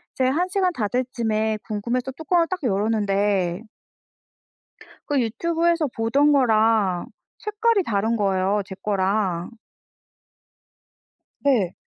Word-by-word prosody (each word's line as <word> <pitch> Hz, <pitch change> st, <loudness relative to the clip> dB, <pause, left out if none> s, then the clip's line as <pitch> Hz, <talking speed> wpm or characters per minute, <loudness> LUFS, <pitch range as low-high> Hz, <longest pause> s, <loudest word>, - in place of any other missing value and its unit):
제가 260 Hz, 0 st, +2 dB
1 355 Hz, +3 st, +1 dB
시간 370 Hz, -1 st, +1 dB
다 215 Hz, -7 st, -1 dB
될 250 Hz, +3 st, -1 dB
쯤에 220 Hz, -2 st, 0 dB
궁금해서 235 Hz, +5 st, -2 dB
뚜껑을 330 Hz, +4 st, +1 dB
딱 370 Hz, +1 st, -3 dB
열었는데 200 Hz, -4 st, 0 dB, 1.5 s
그 290 Hz, -2 st, +1 dB
유튜브에서 330 Hz, +7 st, 0 dB
보던 270 Hz, +6 st, +2 dB
거랑 220 Hz, -8 st, +2 dB, 0.3 s
색깔이 425 Hz, 0 st, +1 dB
다른 220 Hz, 0 st, 0 dB
거예요 195 Hz, 0 st, +1 dB
제 190 Hz, -, -8 dB
거랑. 195 Hz, -3 st, 0 dB, 1.9 s
네. 225 Hz, -11 st, +2 dB
225 Hz, 210 characters per minute, -23 LUFS, 205-285 Hz, 1.9 s, 제가